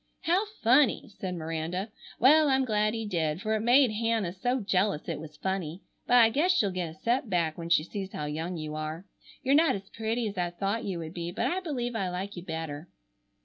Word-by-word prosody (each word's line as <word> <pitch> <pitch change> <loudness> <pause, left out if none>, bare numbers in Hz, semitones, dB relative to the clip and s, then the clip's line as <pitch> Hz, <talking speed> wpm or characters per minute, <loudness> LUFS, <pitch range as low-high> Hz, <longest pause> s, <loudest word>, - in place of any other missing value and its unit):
"How 370 +6 +2 0.2
funny!" 250 +2 +4
said 185 -2 -3
Miranda. 165 +5 -3 0.3
"Well, 300 +5 +6
I'm 265 0 +3
glad 215 -1 +1
he 225 -1 -3
did, 165 -5 -1
for 215 +2 -1
it 220 - +1
made 245 +2 +5
Hannah 220 -4 0
so 245 +7 0
jealous 195 -4 0
it - - -3
was 155 -1 -10
funny. 190 -2 -3 0.2
But 245 - +4
I 230 -2 +7
guess 315 +10 +3
she'll 200 -3 +2
get 180 -2 -3
a 160 - -11
set 240 +7 0
back 170 -4 +1
when 170 -1 -6
she 160 -2 +4
sees 195 +2 -6
how 150 - -4
young 160 +4 -3
you 155 -1 -5
are. 155 +3 -5 0.4
You're 270 0 +3
not 320 -2 +5
as 195 0 -8
pretty 225 +1 -2
as 200 -2 -5
I 175 -1 0
thought 195 +6 -2
you 190 -3 -2
would 160 -1 -6
be, 170 -1 -4
but 190 - -2
I 360 - 0
believe 250 -9 -3
I 195 -4 -1
like 190 +3 -4
you 175 - -6
better." 160 -2 -5
195 Hz, 225 wpm, -29 LUFS, 170-230 Hz, 0.4 s, I